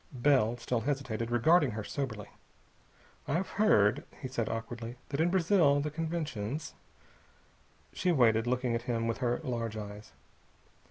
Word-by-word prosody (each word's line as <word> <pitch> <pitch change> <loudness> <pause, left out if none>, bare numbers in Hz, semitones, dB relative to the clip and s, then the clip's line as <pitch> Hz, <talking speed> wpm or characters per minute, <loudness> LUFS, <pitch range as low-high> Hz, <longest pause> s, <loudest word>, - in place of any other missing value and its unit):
Bell 120 -3 +3
still 120 -1 -1
hesitated, 125 -4 -2
regarding 145 +6 +4
her 110 - -3
soberly. 110 -5 -4 1.0
"I've 175 +6 -1
heard," 105 - +4 0.2
he 130 - -5
said 120 -3 -2
awkwardly, 115 +1 -5
"that 140 +2 -1
in 170 - +3
Brazil 175 -5 +4
the 150 +1 -2
conventions...." 155 -5 -3 1.2
She 180 - +1
waited, 115 -6 +3
looking 125 -1 0
at 115 - -1
him 115 -1 0
with 115 0 -2
her 120 -2 0
large 115 -5 -3
eyes. 105 0 -8
125 Hz, 140 wpm, -31 LUFS, 115-150 Hz, 1.2 s, regarding